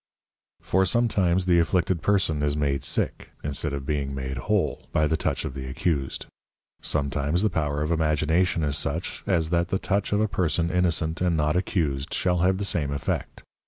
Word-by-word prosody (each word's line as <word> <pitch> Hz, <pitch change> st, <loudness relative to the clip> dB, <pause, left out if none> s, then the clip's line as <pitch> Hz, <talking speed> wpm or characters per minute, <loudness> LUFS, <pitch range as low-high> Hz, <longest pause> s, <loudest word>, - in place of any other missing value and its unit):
_ -, -, -27 dB
For 95 Hz, +1 st, +3 dB
sometimes 95 Hz, -4 st, +2 dB
the 90 Hz, -2 st, +4 dB
afflicted 85 Hz, 0 st, +1 dB
Person 90 Hz, -7 st, +1 dB
is 75 Hz, 0 st, +1 dB
made 70 Hz, -2 st, 0 dB
sick, -, -, -1 dB
(instead 75 Hz, +1 st, -2 dB
of 70 Hz, -1 st, -4 dB
being 70 Hz, -2 st, -2 dB
made 65 Hz, 0 st, -4 dB
whole) 105 Hz, -2 st, -1 dB
by 75 Hz, -, +2 dB
the 80 Hz, +1 st, +1 dB
Touch 80 Hz, -, -1 dB
of 65 Hz, -, -4 dB
the 65 Hz, -1 st, -6 dB
Accused; 70 Hz, -1 st, -2 dB, 0.6 s
sometimes 75 Hz, +4 st, 0 dB
the 110 Hz, -, +2 dB
Power 75 Hz, -2 st, -1 dB
of 75 Hz, -, -2 dB
Imagination 80 Hz, +2 st, +1 dB
is 70 Hz, -1 st, 0 dB
such, 80 Hz, +4 st, -2 dB
as 85 Hz, -4 st, +1 dB
that 85 Hz, 0 st, +2 dB
the 95 Hz, -, 0 dB
Touch 100 Hz, +1 st, -1 dB
of 105 Hz, -, +2 dB
a 110 Hz, -, +2 dB
Person 85 Hz, -3 st, 0 dB
innocent 85 Hz, -3 st, +1 dB
and 90 Hz, -3 st, +2 dB
not 75 Hz, +1 st, +1 dB
accused 80 Hz, -6 st, -1 dB
shall 90 Hz, -2 st, +1 dB
have 95 Hz, +2 st, +3 dB
the 100 Hz, -, -1 dB
same 75 Hz, -7 st, 0 dB
effect. 70 Hz, -, -3 dB
80 Hz, 190 wpm, -25 LUFS, 75-90 Hz, 0.6 s, the